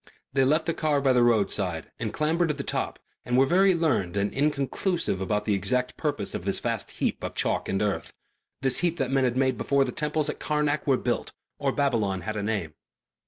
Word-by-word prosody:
They 135 Hz, -1 st, +3 dB
left 155 Hz, +5 st, +2 dB
the 165 Hz, -, 0 dB
car 155 Hz, -3 st, +1 dB
by 135 Hz, -2 st, +3 dB
the 125 Hz, -, +4 dB
roadside 100 Hz, -7 st, +1 dB
and 110 Hz, -2 st, -2 dB
clambered 165 Hz, +3 st, +1 dB
to 150 Hz, -, -1 dB
the 140 Hz, -, -4 dB
top -, -, -2 dB, 0.3 s
and 125 Hz, -, 0 dB
were 135 Hz, -, +6 dB
very 185 Hz, +4 st, +4 dB
learned 130 Hz, -, 0 dB
and 100 Hz, +1 st, 0 dB
inconclusive 145 Hz, -, 0 dB
about 105 Hz, +2 st, -1 dB
the 105 Hz, -, +2 dB
exact 125 Hz, +5 st, 0 dB
purpose 145 Hz, -10 st, -2 dB
of -, -, -4 dB
this 100 Hz, +1 st, 0 dB
vast -, -, -2 dB
heap -, -, -2 dB
of -, -, -4 dB
chalk -, -, 0 dB
and 95 Hz, -, 0 dB
earth, 105 Hz, -2 st, -2 dB, 0.5 s
this 135 Hz, -1 st, +3 dB
heap 175 Hz, -1 st, 0 dB
that 135 Hz, -3 st, -1 dB
men 135 Hz, -1 st, +3 dB
had 125 Hz, 0 st, 0 dB
made 130 Hz, 0 st, +1 dB
before 140 Hz, -1 st, +2 dB
the 125 Hz, -, -3 dB
temples 150 Hz, +1 st, 0 dB
at 150 Hz, -, -4 dB
Karnak 150 Hz, -1 st, 0 dB
were 135 Hz, -2 st, +4 dB
built -, -, -2 dB, 0.3 s
or 140 Hz, -1 st, +1 dB
Babylon 115 Hz, -10 st, 0 dB
had 110 Hz, +4 st, -4 dB
a 105 Hz, -, -2 dB
name. 100 Hz, -7 st, -2 dB
135 Hz, 215 wpm, -26 LUFS, 105-150 Hz, 0.5 s, were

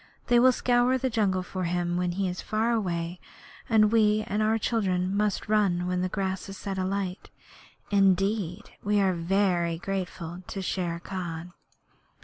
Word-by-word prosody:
They 240 Hz, -1 st, +6 dB
will 255 Hz, +1 st, +7 dB
scour 245 Hz, +1 st, +2 dB
the 260 Hz, 0 st, -1 dB
jungle 195 Hz, -4 st, +1 dB
for 185 Hz, 0 st, -4 dB
him 175 Hz, 0 st, -1 dB
when 180 Hz, 0 st, 0 dB
he 195 Hz, +1 st, -1 dB
is 180 Hz, 0 st, -4 dB
far 220 Hz, +2 st, 0 dB
away, 175 Hz, -5 st, -2 dB, 0.5 s
and 215 Hz, -2 st, +5 dB
we 215 Hz, -1 st, +3 dB
and 210 Hz, +2 st, -1 dB
our 220 Hz, +1 st, +2 dB
children 190 Hz, -5 st, 0 dB
must 210 Hz, 0 st, 0 dB
run 200 Hz, -5 st, +2 dB
when 180 Hz, 0 st, -1 dB
the 185 Hz, -, 0 dB
grass 190 Hz, 0 st, -3 dB
is 195 Hz, -, -7 dB
set 195 Hz, -2 st, -4 dB
alight. 185 Hz, 0 st, -3 dB, 0.6 s
Indeed, 195 Hz, 0 st, +1 dB
we 205 Hz, 0 st, +2 dB
are 190 Hz, -2 st, +3 dB
very 175 Hz, -1 st, +1 dB
grateful 180 Hz, -2 st, -4 dB
to 195 Hz, -, -5 dB
Shere 180 Hz, -3 st, -2 dB
Khan!' 175 Hz, -2 st, -6 dB
195 Hz, 160 wpm, -27 LUFS, 180-210 Hz, 0.6 s, will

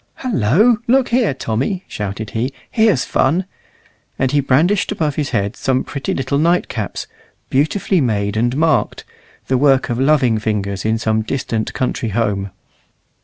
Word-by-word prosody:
"Hullo! 215 Hz, -, +2 dB
look 260 Hz, +1 st, +3 dB
here, 235 Hz, -, +2 dB
Tommy," 135 Hz, -, -2 dB
shouted 105 Hz, +1 st, -5 dB
he; 120 Hz, +4 st, -2 dB, 0.2 s
"here's 220 Hz, -, +3 dB
fun!" 165 Hz, +8 st, +1 dB, 0.7 s
and 130 Hz, -1 st, 0 dB
he 145 Hz, -, +3 dB
brandished 165 Hz, +11 st, +2 dB
above 155 Hz, -7 st, -1 dB
his 145 Hz, 0 st, -2 dB
head 100 Hz, -4 st, -1 dB
some 130 Hz, -1 st, 0 dB
pretty 140 Hz, -2 st, -4 dB
little 135 Hz, +1 st, -1 dB
night 170 Hz, +3 st, +2 dB
caps, 110 Hz, -5 st, -4 dB, 0.5 s
beautifully 165 Hz, +6 st, +1 dB
made 105 Hz, -5 st, 0 dB
and 120 Hz, +4 st, 0 dB
marked, 160 Hz, 0 st, +1 dB, 0.4 s
the 130 Hz, -1 st, +1 dB
work 135 Hz, -2 st, +3 dB
of 120 Hz, -, -2 dB
loving 135 Hz, -5 st, +3 dB
fingers 100 Hz, -3 st, -2 dB
in 110 Hz, +1 st, +1 dB
some 110 Hz, -1 st, 0 dB
distant 110 Hz, -1 st, -3 dB
country 125 Hz, -2 st, -1 dB
home. 100 Hz, -2 st, -1 dB
130 Hz, 150 wpm, -18 LUFS, 110-160 Hz, 0.7 s, look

